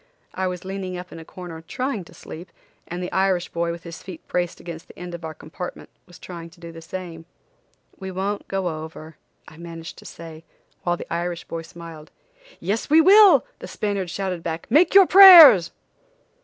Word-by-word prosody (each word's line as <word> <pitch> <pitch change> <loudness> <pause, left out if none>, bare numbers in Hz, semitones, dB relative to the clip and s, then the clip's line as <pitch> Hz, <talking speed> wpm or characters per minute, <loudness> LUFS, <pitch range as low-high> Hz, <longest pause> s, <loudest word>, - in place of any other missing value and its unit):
I 190 0 -2
was 180 0 -6
leaning 190 -1 -6
up 180 +1 -10
in - - -10
a - - -10
corner 170 -1 -10
trying 240 +4 -4
to - - -17
sleep 170 +3 -11 0.4
and 175 +1 -6
the 180 - -6
Irish 190 -2 0
boy, 170 0 -3
with 170 0 -7
his 170 -1 -10
feet 180 -4 -11
braced 175 -1 -3
against 165 -1 -10
the - - -17
end 180 0 -8
of 170 - -8
the 160 -1 -6
compartment, 170 +4 -9 0.2
was 175 0 -16
trying 170 -2 -10
to 170 +1 -22
do 170 -1 -10
the 165 0 -12
same. 165 -1 -9 0.7
"We 190 -1 -7
won't 195 +2 -4
go 195 -2 -3 0.2
over," 160 0 -12 0.3
I 155 - -15
managed 165 -1 -10
to - - -16
say, 165 -1 -11 0.4
while 175 0 -1
the - - -8
Irish 170 0 -4
boy 165 - -7
smiled. 165 -2 -12 0.5
"Yes, 215 +7 -3
we 310 +2 +6
will," 395 +4 +6
the - - -9
Spaniard 200 -4 -4
shouted 185 -1 -4
back, 165 0 -5
"Make 345 +6 +3
your 395 -1 +9
prayers!" 340 - +9
175 Hz, 195 wpm, -22 LUFS, 165-190 Hz, 0.7 s, your